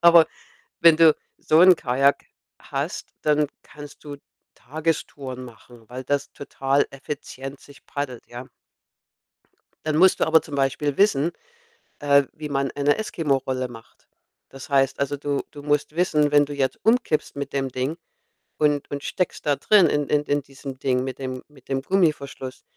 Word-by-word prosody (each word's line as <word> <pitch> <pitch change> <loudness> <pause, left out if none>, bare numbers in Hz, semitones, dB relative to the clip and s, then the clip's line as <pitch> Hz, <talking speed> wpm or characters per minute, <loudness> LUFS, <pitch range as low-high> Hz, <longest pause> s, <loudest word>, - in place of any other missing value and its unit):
Aber, 170 -1 +7 0.5
wenn 165 -2 +7
du 160 -2 +6 0.2
so 155 +2 +3
'n 185 -1 +8
Kajak 135 +2 +1 0.3
hast, - - -5
dann 150 0 +2 0.2
kannst 145 -1 -13
du 145 -1 -8 0.4
Tagestouren 140 -2 -4
machen, 120 -1 -15
weil 130 +1 -7
das 140 +1 -1
total 140 0 0
effizient 135 0 -7
sich 140 -1 -18
paddelt, 140 -5 -5
ja. 120 +2 -9 1.4
Dann 155 -1 0
musst 185 +3 +5
du - - +2
aber 160 0 +5
zum 145 - -8
Beispiel 140 +1 0
wissen, 170 -6 +3 0.7
äh, 140 -1 +4
wie 150 -1 -7
man 140 -1 -1
eine 145 0 +2
Eskimo-Rolle 135 -10 -1
macht. 115 -1 -15 0.4
Das 135 -1 -11
heißt 135 -1 +2
also, 140 +1 0
du 140 0 -2
du 145 - -11
musst 150 +1 -1
wissen, 150 -4 +2
wenn 145 0 +6
du 145 - -8
jetzt 135 -2 -1
umkippst 225 - +1
mit 140 -1 -5
dem 135 -1 -1
Ding 130 +5 -2 0.6
und 145 -1 +1
und 140 0 -5
steckst 180 -2 -3
da 145 -1 +3
drin 205 -5 +5
in 145 -1 0
in 150 0 +2
in 145 0 0
diesem 135 -1 -10
Ding 130 -2 +1
mit 130 +1 -6
dem 130 -1 -5
mit 135 -4 -21
dem 135 -1 -1
Gummiverschluss, 140 -6 -1
145 Hz, 160 wpm, -23 LUFS, 135-150 Hz, 1.4 s, n